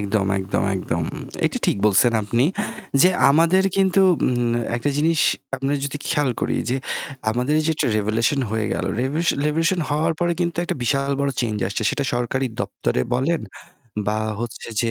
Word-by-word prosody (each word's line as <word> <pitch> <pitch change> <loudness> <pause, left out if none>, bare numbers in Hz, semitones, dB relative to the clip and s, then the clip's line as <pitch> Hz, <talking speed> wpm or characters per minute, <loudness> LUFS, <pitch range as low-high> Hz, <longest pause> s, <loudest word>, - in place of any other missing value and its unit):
একদম, 100 -1 0
একদম, 95 +1 -1
একদম। 85 -3 -2 0.4
এটা - - -2
ঠিক - - +2
বলছেন 105 +4 +4
আপনি 115 +4 +1 0.6
যে 180 - +7 0.2
আমাদের 170 +6 +4
কিন্তু 190 0 +3 0.3
উম 120 -1 +1 0.2
একটা 145 +5 -1
জিনিস 160 +1 +2 0.4
আমরা 135 +2 -1
যদি 140 +1 -3
খেয়াল 145 -3 +1
করি - - 0
যে 130 - +1 0.5
আমাদের 125 +6 0
এই - - -3
যেটা 160 - +1
revolution 110 +6 +1
হয়ে 110 -1 -1
গেল। - - -2 0.2
রেভু 135 +5 -1 0.3
revolution 165 +4 +1
হওয়ার 155 +3 +1
পরে 175 0 +2
কিন্তু 170 -1 -1
একটা - - -2
বিশাল 140 +1 +1
বড় 140 - +1
চেঞ্জ 110 -3 -1
আসছে 105 - -3
সেটা 140 - -2
সরকারি 125 +2 -1
দপ্তরে - - -1
বলেন 150 +7 +1 0.7
বা 105 - +1 0.2
হচ্ছে 120 0 -6
যে 115 -1 0
130 Hz, 165 wpm, -22 LUFS, 110-155 Hz, 0.7 s, যে